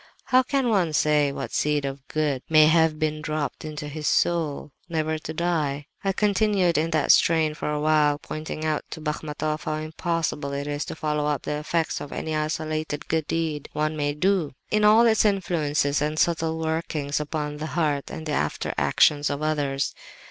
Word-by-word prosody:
How 255 0 +4
can 265 -1 0
one 185 -7 +2
say 150 -1 +3
what 135 -4 -5
seed 150 -1 +1
of 135 0 -6
good 150 -4 -1
may 155 -1 +7
have 160 0 +4
been 155 0 -1
dropped 155 -1 -3
into 150 -1 -6
his 150 +1 -4
soul, 155 -4 0 0.2
never 155 -1 -1
to 155 - -6
die?' 155 -4 -1 0.2
"I 195 - +2
continued 200 -3 +2
in 160 +2 +1
that 155 -3 +3
strain 160 -2 +4
for - - -5
a - - -1
long 150 - -2
while, 150 -1 +3
pointing 155 +1 -6
out 155 -1 0
to - - -7
Bachmatoff 150 0 -3
how 155 - -1
impossible 155 -2 -2
it 140 0 -3
is 145 0 -3
to - - -6
follow 150 -1 -1
up 145 -2 -1
the 150 - -2
effects 160 +2 -1
of 145 - -7
any 160 -1 -3
isolated 155 0 -3
good 160 -2 0
deed 160 -3 -2
one 155 +1 -1
may 145 -1 -1
do, 180 -4 +1 0.2
in 215 0 +2
all 215 +3 +7
its 220 -2 +4
influences 155 -8 +1
and 150 +1 -1
subtle 160 -1 +1
workings 160 -3 -2
upon 150 0 -3
the 155 +1 -4
heart 150 -4 0
and 160 - -7
after 150 - -1
actions 145 -1 +3
of 145 +1 -3
others. 145 -3 0
155 Hz, 185 wpm, -25 LUFS, 150-160 Hz, 0.2 s, may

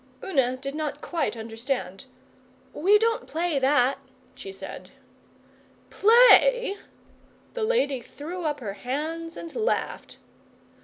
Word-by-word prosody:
Una 260 -8 +1
did 275 +1 -6
not 300 -1 -4
quite 290 -10 -2
understand. 225 -2 -4 0.7
'We 395 +7 +4
don't 455 +1 0
play 325 -2 -1
that,' 265 -1 +2 0.3
she 390 - -9
said. 390 - -9 1.0
'Play?' - - +5 0.8
The 475 - -3
lady 285 - +1
threw 330 +9 -8
up 295 -3 -2
her 205 -4 -4
hands 310 +9 -5
and 335 - -9
laughed. 470 0 -2
300 Hz, 110 wpm, -25 LUFS, 260-390 Hz, 1.0 s, Play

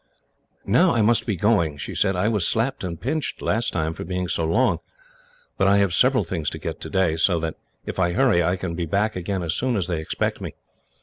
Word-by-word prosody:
"Now 145 - +4
I 110 - +3
must 115 +2 +3
be 105 - 0
going," 85 -6 +1
she - - -6
said. 95 - +1
"I 90 +4 +1
was 105 -6 +1
slapped 115 +2 0
and 85 -3 -4
pinched, 150 - -2
last 115 +3 0
time, 80 -1 -1
for - - -7
being 90 +1 -3
so 85 - -1
long, 115 +11 +2 0.8
but - - +4
I 100 +1 +5
have 100 -3 +2
several 130 +2 +4
things 80 -3 -3
to - - -7
get - - -6
today, 95 -4 0
so 85 +1 +2
that 80 -1 -3 0.3
if - - -5
I 85 -1 +2
hurry 115 -5 +3
I 90 +2 +1
can 90 -2 -4
be 85 0 -3
back 100 +6 0
again 90 +1 -3
as 80 -1 -1
soon 125 +6 0
as 95 -4 0
they 85 -3 -2
expect 80 - -2
me. - - -6
95 Hz, 230 wpm, -23 LUFS, 85-110 Hz, 0.8 s, I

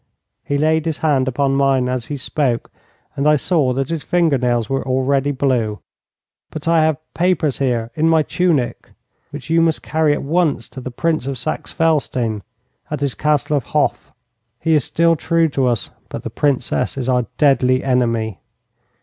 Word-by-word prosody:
He 145 - -1
laid 160 +2 +1
his 160 - -1
hand 135 -4 +2
upon 135 +1 +1
mine 135 -2 +2
as 125 -2 -3
he 145 - -4
spoke, 130 -3 -1 0.4
and 140 +2 +2
I 150 - +5
saw 150 -3 +1
that 135 +1 -2
his 165 -2 -2
finger 165 -6 +1
nails 120 -2 0
were 135 0 -1
already 135 +2 +1
blue. 130 -6 0 0.7
'But 155 0 -7
I 165 -1 +4
have 155 -2 +2 0.2
papers 175 -5 +1
here 120 -4 -1
in 160 +4 +1
my 160 -1 +4
tunic 160 -8 -1 0.4
which 145 +1 -8
you 165 0 +4
must 165 -1 +1
carry 155 -1 +1
at - - -3
once 155 -4 0
to 130 - -9
the 130 - -5
Prince 155 +2 -1
of 135 -1 -3
Saxe 155 +6 -4
Felstein, 130 -9 0 0.5
at 150 -1 -4
his 140 -3 0
Castle 150 -1 +1
of 130 - -3
Hof. 145 - 0 0.5
He 165 - +1
is 150 -4 +3
still 165 +4 +2
true 165 +1 +1
to 135 -2 0
us, 120 -5 -1 0.2
but - - -6
the - - -5
Princess 135 -2 0
is 130 -2 -3
our 125 -3 +1
deadly 130 -3 +3
enemy. 115 -6 0
140 Hz, 180 wpm, -19 LUFS, 125-155 Hz, 0.7 s, I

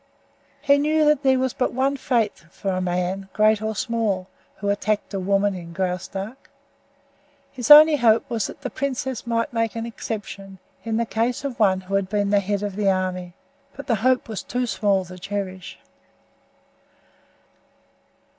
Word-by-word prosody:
He 280 0 +4
knew 305 +1 +2
that 300 -2 +3
there 265 -2 +3
was 260 -1 0
but 255 - -1
one 270 +3 +1
fate 235 -5 -1
for 195 +2 -4
the 185 0 -1
man, 180 +2 -2
great 215 0 +3
or 220 0 -2
small, 210 -5 -1 0.3
who 200 - -3
attacked 205 +1 -1
a 195 - -1
woman 200 +2 +1
in 170 -2 -8
Graustark. 190 +6 -4 1.0
His 245 -4 -5
only 300 +1 +10
hope 230 -3 +3
was 225 -3 -1
that - - -11
the - - -5
princess 265 -2 -3
might 230 0 -1
make 230 -1 -1
an 230 0 -3
exception 200 -4 -7 0.3
in 225 -1 -1
the 235 - +1
case 230 +4 -1
of 275 -4 -5
one 190 -3 +3
who 190 +1 -9
had 195 -1 +1
been 205 -1 0
the 205 - +4
head 200 +1 -2
of 205 -2 -3
the 205 -2 +2
army 185 -2 -2 0.4
but 280 - -8
the 230 - +1
hope 255 +1 +2
was 220 -3 -5
too 250 0 -2
small 200 -5 +1
to 180 +1 -11
cherish. 190 -1 -5
210 Hz, 170 wpm, -23 LUFS, 195-245 Hz, 1.0 s, only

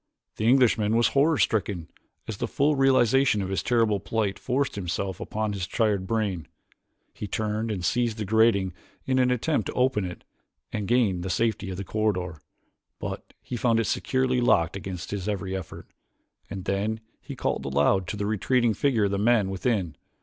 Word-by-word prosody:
The 110 - 0
Englishman 115 -4 +4
was 120 0 +4
horror 145 +3 +3
stricken 100 -9 0 0.4
as 110 - -5
the - - -2
full 145 +2 +2
realization 135 -3 +4
of 95 - -4
his 95 - -1
terrible 115 -4 +2
plight 105 0 -2
forced 135 +3 -1
itself 95 0 -3
upon 110 -2 -2
his 95 -3 -3
tired 100 -3 0
brain. 100 -9 -1 0.7
He 105 - -6
turned 110 +2 -2
and 95 -5 -3
seized 120 +2 0
the 105 - -3
grating 100 -3 +3 0.3
in 130 -1 +1
an 125 0 +3
attempt 125 +5 0
to - - -4
open 125 -5 +1
it 90 -1 -6 0.5
and 105 -2 -2
gain 110 -7 +2
the 95 - -4
safety 105 +1 0
of 95 - -5
the 100 - -4
corridor, 95 -7 -2 0.6
but - - -7
he - - -5
found 115 -1 +2
it 115 - +1
securely 130 +1 0
locked 85 -8 +3
against 90 -2 -6
his 100 0 -3
every 95 -2 -3
effort, 95 -4 -7 0.6
and 95 -2 -6
then 105 +3 -1 0.2
he - - -8
called - - -2
aloud 70 +7 +2
to 105 - -4
the 100 - -2
retreating 115 +3 +1
figure 120 -3 +1
of 100 - 0
the 100 - -1
men 105 -3 +3
within. 95 - -1
105 Hz, 180 wpm, -26 LUFS, 95-120 Hz, 0.7 s, Englishman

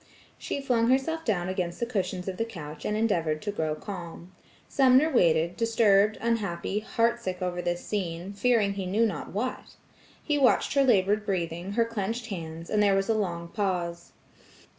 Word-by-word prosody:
She 280 - -4
flung 240 -4 +2
herself 320 +5 +1
down 180 -6 0
against 180 -2 -3
the 235 - 0
cushions 185 -5 -3
of 185 -1 -3
the - - 0
couch, 155 -9 -8
and 210 - 0
endeavored 165 -9 +1
to 210 - -2
grow 155 -6 -2
calm. 175 0 -8 0.4
Sumner 270 +3 +4
waited, 170 -5 +3
disturbed, 215 -2 +3
unhappy, 210 -4 -1
heartsick, 230 -4 -1
over 180 -1 -2
this 175 0 -3
scene, 185 -2 -3
fearing 205 -1 +2
he 195 -2 -4
knew 215 +5 +2
not 190 -9 -4
what. 245 +6 -4 0.5
He 295 -2 0
watched 265 - +3
her 275 0 +4
labored 210 -4 +3
breathing, 175 -1 -3
her 230 +2 +2
clenched 230 +1 -3
hands, 165 -3 -6
and 210 - +3
there 200 -1 +4
was 195 +2 0
a - - +4
long 170 -5 -2
pause. 175 -4 -2
200 Hz, 170 wpm, -27 LUFS, 175-230 Hz, 0.5 s, Sumner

